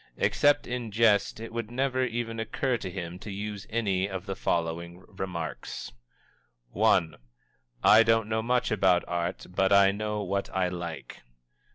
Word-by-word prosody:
Except 145 0 +3
in 120 -2 -4
jest 110 -1 +3
it 115 0 -8
would 115 -2 -3
never 130 +1 0
even 115 -2 -3
occur 125 +3 -1
to 100 - -5
him 90 -1 -6
to 105 - -9
use 100 0 -5
any 100 -4 0
of 95 -1 -5
the 95 -2 -4
following 85 +1 -2
remarks: 90 -4 -5 0.8
I. 80 -2 +3 0.7
"_I 110 +1 +8
don't 115 -1 +2
know 110 0 0
much 125 +2 0
about 95 -4 +3
Art, 85 +1 -3
but 95 +1 +1
I 100 0 +6
know 105 +1 -3
what 100 +1 -2
I 95 -1 +2
like. 85 -5 -7
100 Hz, 155 wpm, -28 LUFS, 90-115 Hz, 0.8 s, I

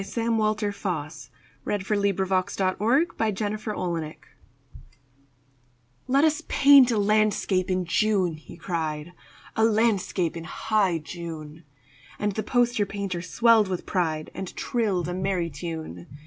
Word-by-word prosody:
Sam 230 +2 -1
Walter 215 -1 0
Foss 170 -7 -5 0.3
The 205 - -1
Poster 205 +2 -2
Painter's 200 -2 +1 0.9
Masterpiece 205 -6 -2 1.9
"LET 275 +3 +3
us 315 0 +2
paint 275 -2 +7
a 230 - +1
landscape 205 -3 +1
in 185 -1 0
June," 190 -1 +1
he 155 - -13
cried; 160 -1 -4 0.4
"A 220 - +2
Landscape 210 -6 +1
in 165 -1 -6
high 200 -2 0
June." 160 -1 -8 0.5
And 210 0 -1
the 215 - -3
poster 240 -3 +1
painter 195 -3 -4
swelled 225 +2 +4
with 185 -2 -4
pride 160 -4 -1
And 190 -2 -7
trilled 200 -8 -1
a 175 - -3
merry 185 -2 -1
tune. 155 - -7
195 Hz, 120 wpm, -25 LUFS, 170-215 Hz, 1.9 s, paint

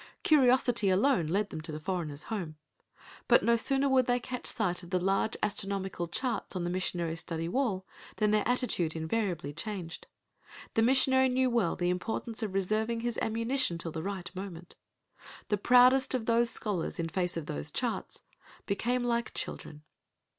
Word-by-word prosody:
Curiosity 250 -7 +4
alone 190 - +3
led 200 +5 0
them 155 - -5
to 160 - -6
the 155 - -5
foreigner's 155 -4 -4
home. 170 -7 -4 0.7
But - - +5
no 235 - +4
sooner 270 +4 +2
would 260 -2 +3
they 245 0 +2
catch 250 +1 -5
sight 185 -7 0
of 175 - -12
the 185 - +1
large 195 +4 0
astronomical 195 -3 -1
charts 230 +4 -2
on 180 - -2
the 175 - -2
missionary's 175 -2 -2
study 165 -1 -4
wall 195 -3 -1 0.3
than 210 -1 +2
their 215 0 +3
attitude 240 - 0
invariably 160 -3 -2
changed. 180 -1 -6 0.7
The 225 - +2
missionary 260 +2 +4
knew 255 0 +2
well 230 -8 +1
the 175 0 0
importance 220 +5 -3
of 205 -4 -3
reserving 220 +4 0
his 240 -1 -2
ammunition 230 -3 0
till 165 0 -5
the 160 - -4
right 190 -1 -5
moment! 180 -3 -8 0.7
The 210 - +2
proudest 250 +4 +5
of 235 -3 -2
those 235 +1 +3
scholars 200 -8 -2
in 165 - -2
face 175 0 -2
of 165 - -4
those 70 - -5
charts - - -3 0.4
became 240 +5 0
like 235 -1 -1
children. 150 -1 -5
200 Hz, 170 wpm, -30 LUFS, 175-240 Hz, 0.7 s, But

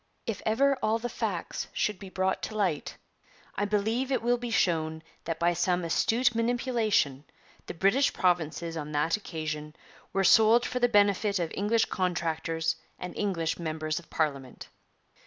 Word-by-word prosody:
'If 225 - -3
ever 275 +6 +3
all 220 +1 +2
the 240 +1 -4
facts 205 -8 -3
should 210 -3 -1
be 195 - -9
brought 190 0 -1
to 215 - -5
light, 185 -8 -1 0.6
I 205 - -1
believe 220 +6 0
it 260 - 0
will 240 0 +2
be 240 0 -4
shown 160 -6 0 0.2
that 165 -1 -2
by 175 +1 +2
some 175 +1 0
astute 235 +9 +2
manipulation 230 - +1 0.4
the - - -6
British 200 +11 +3
provinces 170 -2 0
on 150 -1 -5
that 150 +3 +2
occasion 155 -6 -5 0.4
were 195 - +1
sold 220 +5 +6
for 250 - -2
the 245 0 +3
benefit 205 -1 +3
of 170 -3 -2
English 220 +3 +2
contractors 165 -2 -1 0.2
and 180 0 -7
English 175 -6 -1
members 155 -1 -2
of 170 - -17
Parliament.' 140 -5 -3
185 Hz, 155 wpm, -28 LUFS, 160-225 Hz, 0.6 s, sold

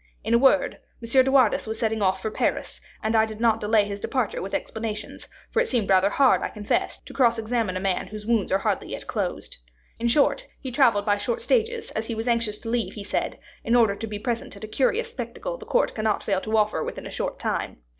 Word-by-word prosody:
In 220 +2 0
a 235 - +6
word, 275 +2 +3 0.2
M. 255 +3 +4
de 265 - 0
Wardes 255 -5 +4
was 220 - -3
setting 220 -1 -1
off 190 -1 +1
for 220 - -2
Paris, - - -2 0.2
and 220 +1 +1
I 220 0 +4
did 220 -1 -8
not 225 -1 +3
delay 210 0 +3
his 200 0 -5
departure 255 -1 -1
with 195 - -3
explanations; 215 -2 -5 0.2
for 465 - +3
it 485 - 0
seemed 225 -7 0
rather 190 +1 +5
hard, 265 +5 +4
I - - -2
confess, 210 -2 -1
to - - -12
cross 235 -3 +3
examine 225 -4 -1
a - - -2
man 190 -1 -1
whose 210 -1 -8
wounds 225 -4 +1
are 190 - +4
hardly - - -1
yet - - -6
closed. - - -3 0.4
In 235 - 0
short, 295 - +2
he 260 - -6
travelled 235 -6 +3
by 205 -1 +3
short 480 - -2
stages, 460 -1 0
as 220 +1 -3
he 230 - -3
was 225 +2 -4
anxious 230 -3 +1
to 225 - -6
leave, 235 -1 -1
he 205 - -6
said, - - -2 0.3
in 235 - +2
order 225 -4 +4
to 225 - -5
be 210 -1 -5
present 230 -2 -3
at 200 - -12
a - - -4
curious 270 - 0
spectacle - - -5
the - - -11
court - - +2
cannot 215 -1 0
fail 195 -2 0
to 220 +2 0
offer 210 -7 +1
within - - -6
a - - -7
short - - -3
time. - - -2
225 Hz, 240 wpm, -25 LUFS, 210-245 Hz, 0.4 s, a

